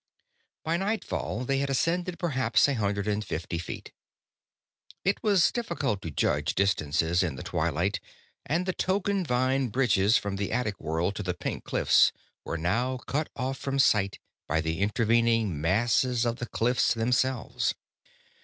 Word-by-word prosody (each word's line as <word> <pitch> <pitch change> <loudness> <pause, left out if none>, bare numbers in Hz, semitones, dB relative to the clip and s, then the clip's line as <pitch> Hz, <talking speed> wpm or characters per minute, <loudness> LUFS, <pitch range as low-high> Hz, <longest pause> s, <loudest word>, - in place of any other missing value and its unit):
By 165 +2 0
nightfall, 195 - -2
they 135 +1 +1
had 140 0 -1
ascended 170 +6 0
perhaps 130 - +2
a 140 - +1
hundred 100 -3 -1
and 105 0 0
fifty 85 -3 -4
feet. 85 - -7 1.1
It 195 +1 +1
was 200 -5 +4
difficult 140 - -2
to 85 - -5
judge - - 0
distances 85 -3 +1
in 85 -7 -1
the 65 - -7
twilight, 85 +5 -1 0.4
and 170 +5 -1
the 185 - -1
token 195 +1 0
vine 130 -1 +1
bridges 115 -3 +3
from 100 -1 -3
the 100 0 -2
attic 110 -5 -1
world 80 +5 -1
to - - -3
the 90 -3 -2
pink 90 - -4
cliffs - - +4 0.3
were - - -3
now 120 +11 0
cut 145 +5 -3
off 130 +2 -3
from 135 0 -2
sight 105 -7 +3 0.3
by 80 +2 +1
the 80 +1 -2
intervening 115 -4 +2
masses 115 +7 +2
of 120 0 -1
the 120 - -5
cliffs 120 -1 +1
themselves. 125 +2 0
115 Hz, 155 wpm, -28 LUFS, 95-135 Hz, 1.1 s, was